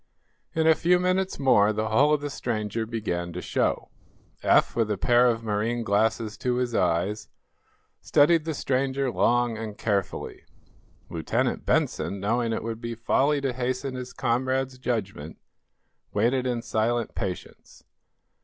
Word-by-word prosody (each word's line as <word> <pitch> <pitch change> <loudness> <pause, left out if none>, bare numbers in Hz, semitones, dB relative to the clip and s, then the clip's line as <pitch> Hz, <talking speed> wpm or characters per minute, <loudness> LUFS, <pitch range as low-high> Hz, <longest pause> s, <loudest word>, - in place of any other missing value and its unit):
In 160 0 +2
a 160 - +7
few 175 +3 +3
minutes 185 +1 0
more 110 -7 +4
the 110 +1 -2
hull 140 +7 +4
of 150 -1 +2
the 145 -1 -4
stranger 110 -3 -3
began 90 -7 -3
to 90 - -4
show. - - -1 0.5
Eph, - - +3
with 115 -2 +1
a 105 - -1
pair 120 +5 +4
of 115 -1 0
marine 110 +2 -1
glasses 110 +1 0
to 125 -1 0
his 125 -1 -1
eyes, 95 +4 0 0.7
studied 160 +2 +4
the 160 -1 -3
stranger 135 0 0
long 120 -2 +1
and 110 -2 -6
carefully. 100 -4 -2 0.7
Lieutenant 80 -3 -1
Benson, 100 - 0
knowing 115 +4 0
it - - -2
would 115 0 -5
be 115 -1 -4
folly 140 +5 +1
to 135 -2 -1
hasten 130 +2 -2
his 125 0 -6
comrade's 130 +1 -1
judgment, 100 -11 -3 0.8
waited 130 +2 +2
in 120 -2 -2
silent 115 +1 -1
patience. 90 -3 -7
120 Hz, 145 wpm, -26 LUFS, 110-130 Hz, 0.8 s, a